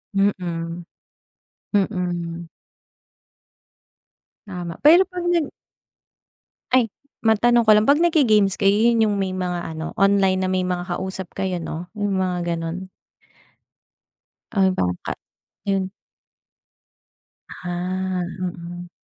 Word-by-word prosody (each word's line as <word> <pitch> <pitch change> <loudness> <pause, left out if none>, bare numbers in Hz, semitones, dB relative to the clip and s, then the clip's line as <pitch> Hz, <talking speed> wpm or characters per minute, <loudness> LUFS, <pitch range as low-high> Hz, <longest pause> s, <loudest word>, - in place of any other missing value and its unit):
Mm. 175 -4 -1 0.9
Mm. 175 -4 -1 2.0
Tama, 175 -3 -6
pero 340 +5 +8
pag 360 -1 -5
nag 335 -5 +1 1.2
Ay 245 -5 +3 0.3
matanong 235 +2 +4
ko 215 - +6
lang. 215 +5 +4
Pag 290 +3 +5
nag-ge-games 225 - +4
kayo 200 -1 +3
yun 225 0 +3
yung 205 - 0
may 190 -1 -1
mga 180 -3 -3
ano, 160 +1 -5
online 195 -1 +3
na - - -1
may 185 -1 +1
mga 180 -1 -2
kausap 190 -1 -5
kayo 190 -2 -2
no? 170 +1 -6
Yung 205 -1 0
mga 175 -2 -1
ganun? 170 +3 -5 1.6
Ay 195 -3 +3
baka 90 -1 -2 0.5
yun. 195 -1 0 1.6
Ah, 180 +1 -3 0.2
mm. 175 -1 -6
185 Hz, 105 wpm, -22 LUFS, 175-205 Hz, 2.0 s, pero